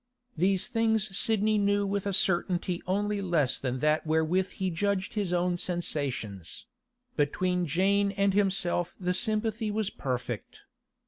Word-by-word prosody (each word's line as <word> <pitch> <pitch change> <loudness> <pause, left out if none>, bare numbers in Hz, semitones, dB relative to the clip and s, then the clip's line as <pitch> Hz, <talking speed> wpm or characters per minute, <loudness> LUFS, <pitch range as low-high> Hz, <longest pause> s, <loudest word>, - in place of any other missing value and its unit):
These 185 +3 +2
things 220 -3 0
Sidney 215 0 +2
knew 205 0 +2
with 200 0 -2
a - - 0
certainty 180 -1 +1
only 205 +2 0
less 165 -8 +1
than 130 -1 -2
that 150 +1 +2
wherewith 160 +4 +1
he 190 -1 -2
judged 190 +2 -1
his 205 -5 -1
own 175 0 +1
sensations; 140 - -3 0.5
between 180 +4 0
Jane 200 +6 +2
and 200 0 +2
himself 185 -3 +1
the 180 -1 0
sympathy 215 +2 0
was 210 -1 -1
perfect. 125 -2 -4
185 Hz, 135 wpm, -28 LUFS, 170-205 Hz, 0.5 s, These